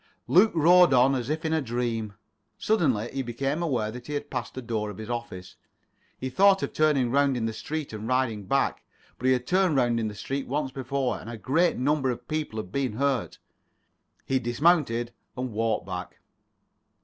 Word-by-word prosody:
Luke 205 +5 +5
rode 175 0 +6
on 130 +2 +5
as 125 -1 -2
if 155 +2 -2
in 160 - 0
a 160 - +2
dream. 115 -4 -2 0.4
Suddenly 135 - +1
he 135 - -1
became 135 +6 -2
aware 125 -10 -1
that 125 +2 -9
he 150 - -5
had 145 0 -5
passed 125 -2 -4
the 130 - -4
door 110 -2 -2
of 100 - -8
his 110 +2 -6
office. 95 -7 -6 0.6
He 130 - -4
thought 195 +7 +4
of - - -3
turning 145 -6 +2
round 140 -1 +3
in 115 - -1
the 115 - -2
street 150 +2 -5
and 110 +1 -6
riding 125 -5 0
back, 135 +4 0 0.4
but 130 - -1
he 130 - +5
had 125 -1 -1
turned 185 0 +2
round 120 -3 +2
in 110 - -1
the 105 - -6
street 135 +6 -4
once 140 0 -2
before, 135 0 -2
and 115 - -9
a 120 - -6
great 160 +10 +1
number 140 +1 +1
of 120 - -5
people 155 -7 -3
had 90 -4 -5
been 130 -3 -1
hurt. 135 +1 -1 0.9
He 135 0 +1
dismounted 120 -2 +1 0.2
and 125 -1 -3
walked 110 0 -1
back. 90 -1 -6
130 Hz, 195 wpm, -26 LUFS, 115-145 Hz, 0.9 s, rode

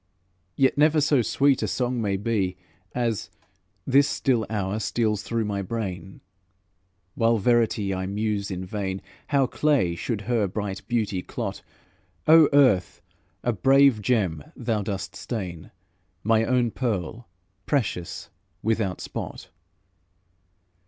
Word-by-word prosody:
Yet 135 +1 +2
never 155 +1 +5
so 145 -3 +3
sweet 135 +4 +2
a - - 0
song 125 -1 -1
may 100 -2 0
be 100 -3 -1 0.4
As, 115 -4 -1 0.6
this 140 +2 +4
still 125 -5 0
hour, 105 -1 -2
steals 110 0 0
through 115 -1 -2
my 100 -1 -2
brain, 95 -3 -5 0.9
While 115 0 +2
verity 110 -2 +2
I 95 0 -3
muse 105 0 -2
in 95 -1 -4
vain 95 0 -4 0.2
How 140 -2 +3
clay 135 - +1
should 105 +5 -3
her 110 -1 0
bright 100 0 -4
beauty 110 -6 0
clot; - - -5 0.7
O 160 -1 +8
Earth! 130 -11 +3 0.4
a 120 - +1
brave 135 +2 +4
gem 95 - 0
thou 115 -3 -1
dost 100 -1 -4
stain, 90 -9 -5 0.5
My 110 +1 +3
own 125 -2 +2
pearl, 115 -2 -3 0.4
precious, 110 - -2 0.3
without 110 -4 0
spot! - - -6
110 Hz, 125 wpm, -25 LUFS, 95-125 Hz, 0.9 s, O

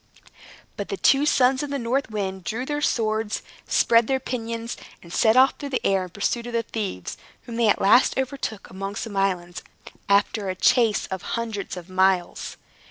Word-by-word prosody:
But - - -5
the 395 - -3
two 285 -3 +4
sons 260 -2 +3
of 290 - -4
the 280 - -2
North 250 +1 -1
Wind 190 -3 -4
drew 235 +8 -3
their 295 +1 -2
swords, 220 -5 0 0.2
spread 230 -1 +4
their 265 0 +1
pinions, 230 -2 -4 0.3
and 170 0 -11
set 220 +2 +4
off 260 +1 +5
through 285 - -5
the 260 - -2
air 195 -1 +2
in - - -11
pursuit 230 +5 -2
of 240 - -7
the 230 0 +1
thieves, 205 - -5 0.3
whom 235 - -8
they 230 -1 +2
at 210 - +3
last 210 +6 +4
overtook 265 -5 -3
among 195 +1 -5
some 210 0 -5
islands, 180 -3 -1 0.5
after 200 0 +2
a 185 - -2
chase 230 +1 +3
of 190 -1 -3 0.2
hundreds 220 -5 -4
of 175 -1 -9
miles. 185 -1 0
220 Hz, 185 wpm, -24 LUFS, 195-250 Hz, 0.5 s, off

